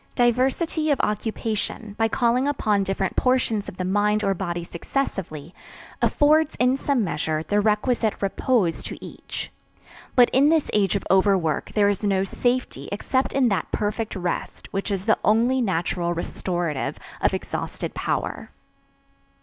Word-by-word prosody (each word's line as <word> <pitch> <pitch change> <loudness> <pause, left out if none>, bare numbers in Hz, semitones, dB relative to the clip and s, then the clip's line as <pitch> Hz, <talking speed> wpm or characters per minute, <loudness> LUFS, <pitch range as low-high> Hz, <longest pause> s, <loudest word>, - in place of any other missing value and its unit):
Diversity 265 +6 +1
of 285 - +2
occupation, 215 0 -2
by 225 +1 +2
calling 240 +4 +1
upon 210 -8 +1
different 195 0 -2
portions 250 -5 +1
of - - -12
the 185 - -2
mind 210 +2 +2
or 195 -1 +2
body 175 -2 -3
successively, 170 - -4 0.5
affords, 305 +1 +3
in 250 +1 +3
some 275 -3 0
measure, 155 -2 -1
the 205 +5 +1
requisite 220 +1 +1
repose 195 -2 +1
to - - -6
each. - - -7 0.6
But 245 -2 +6
in 275 +3 +5
this 320 -2 +2
age 200 -3 +2
of - - -1
overwork 190 -5 +2
there 205 -1 +4
is 205 0 0
no 195 -2 +2
safety 245 +6 -1
except 260 +6 -1
in 265 -3 +3
that 195 - -1
perfect 215 +1 -2
rest 180 -2 -4
which 195 +2 -2
is 195 -1 -2
the 220 - +3
only 235 +5 +3
natural 175 -3 -1
restorative 170 -3 -2 0.2
of - - +2
exhausted - - -4
power. - - -3
210 Hz, 145 wpm, -24 LUFS, 190-250 Hz, 0.6 s, But